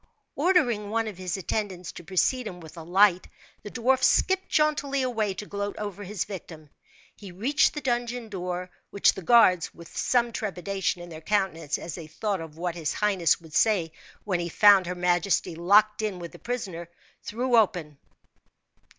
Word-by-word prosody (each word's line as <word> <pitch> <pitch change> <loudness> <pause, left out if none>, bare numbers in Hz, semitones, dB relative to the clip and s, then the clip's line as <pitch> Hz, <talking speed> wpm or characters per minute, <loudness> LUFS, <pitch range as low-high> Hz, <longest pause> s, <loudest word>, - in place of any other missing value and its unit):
Ordering 245 - +2
one 225 +1 0
of 200 -4 -7
his 185 0 -3
attendants 190 -1 -3
to - - -11
precede 215 +7 0
him 180 -3 -8
with 160 -2 -12
a 165 - -8
light, 185 +2 +3 0.3
the 210 - -8
dwarf 255 +3 +1
skipped 380 0 +2
jauntily 290 -3 +1
away, 220 -6 -1
to 210 - -6
gloat 200 0 -4
over 205 -1 -5
his 200 -1 -3
victim. 160 -6 -10 0.4
He 200 -3 -11
reached 240 - +1
the 295 - -4
dungeon 240 -2 -2
door, 180 -2 -5 0.2
which 200 - +3
the 190 - -8
guards, 185 -3 +4
with 170 -1 -13
some 240 -1 +1
trepidation 195 -3 -3
in 175 - -10
their 160 -1 -9
countenance, 165 -6 -1
as 165 - -7
they 165 -3 -8
thought 195 +4 -3
of 160 -1 -10
what 175 0 -2
his 165 -3 -3
highness 195 -6 +2
would 160 -2 -16
say 185 -4 +2 0.3
when 185 -4 -1
he 170 0 -3
found 200 -1 +6
her 180 - -3
majesty 180 0 +1
locked 210 +6 +3
in 210 -4 -2
with 170 -1 -8
the - - -14
prisoner, 190 -9 -5 0.3
threw 245 +3 -1
open. 175 -10 +1
195 Hz, 175 wpm, -26 LUFS, 175-220 Hz, 0.4 s, found